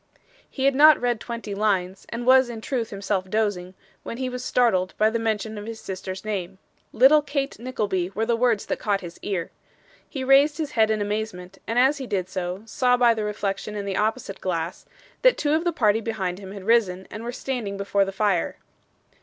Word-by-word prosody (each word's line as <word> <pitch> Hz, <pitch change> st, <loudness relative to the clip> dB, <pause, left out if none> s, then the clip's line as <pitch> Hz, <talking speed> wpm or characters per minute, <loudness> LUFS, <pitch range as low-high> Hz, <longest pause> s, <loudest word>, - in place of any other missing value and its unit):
He 265 Hz, -, -3 dB
had 275 Hz, -, +4 dB
not 300 Hz, +2 st, +7 dB
read 240 Hz, -2 st, 0 dB
twenty 230 Hz, -3 st, -6 dB
lines, 195 Hz, -2 st, -1 dB
and 235 Hz, +1 st, -5 dB
was 260 Hz, 0 st, +6 dB
in 230 Hz, -2 st, -6 dB
truth 235 Hz, -1 st, -2 dB
himself 195 Hz, -2 st, -2 dB
dozing, 190 Hz, -4 st, -1 dB, 0.3 s
when 230 Hz, -, -6 dB
he 260 Hz, 0 st, -2 dB
was 250 Hz, 0 st, -5 dB
startled 220 Hz, -8 st, +1 dB
by 215 Hz, +1 st, +3 dB
the 230 Hz, -, -1 dB
mention 220 Hz, -1 st, -2 dB
of 205 Hz, -, -8 dB
his 225 Hz, -1 st, -6 dB
sister's 190 Hz, +1 st, -6 dB
name. 190 Hz, -3 st, -3 dB, 0.3 s
'Little 270 Hz, +6 st, +6 dB
Kate 280 Hz, -4 st, -3 dB
Nickleby' 210 Hz, -7 st, -2 dB
were 220 Hz, +2 st, 0 dB
the 235 Hz, 0 st, +1 dB
words 230 Hz, -3 st, +1 dB
that -, -, -3 dB
caught 200 Hz, -2 st, 0 dB
his 175 Hz, -2 st, -9 dB
ear. 185 Hz, -5 st, -3 dB, 0.6 s
He 270 Hz, -3 st, -4 dB
raised 275 Hz, +3 st, +5 dB
his 310 Hz, -3 st, -3 dB
head 220 Hz, -2 st, +3 dB
in 215 Hz, -1 st, +1 dB
amazement, 205 Hz, -3 st, -4 dB
and 230 Hz, -, -2 dB
as 270 Hz, +4 st, +4 dB
he 265 Hz, -, -5 dB
did 185 Hz, -4 st, -2 dB
so, 185 Hz, +1 st, -4 dB
saw 245 Hz, +2 st, +2 dB
by 240 Hz, -1 st, +5 dB
the 220 Hz, -1 st, -3 dB
reflection 210 Hz, 0 st, -3 dB
in 205 Hz, -1 st, -4 dB
the 195 Hz, -1 st, -2 dB
opposite 215 Hz, -1 st, -2 dB
glass, 170 Hz, -2 st, -3 dB, 0.3 s
that -, -, +5 dB
two 295 Hz, 0 st, +1 dB
of 325 Hz, +2 st, +1 dB
the 345 Hz, -, +2 dB
party 225 Hz, -7 st, +2 dB
behind 190 Hz, -5 st, -3 dB
him 195 Hz, -1 st, -9 dB
had 200 Hz, -1 st, -8 dB
risen 190 Hz, -4 st, +2 dB
and 215 Hz, -, -7 dB
were 240 Hz, -, -3 dB
standing 240 Hz, -6 st, -4 dB
before 200 Hz, 0 st, +1 dB
the 195 Hz, -, -3 dB
fire. 195 Hz, -3 st, 0 dB
215 Hz, 210 wpm, -24 LUFS, 195-245 Hz, 0.6 s, not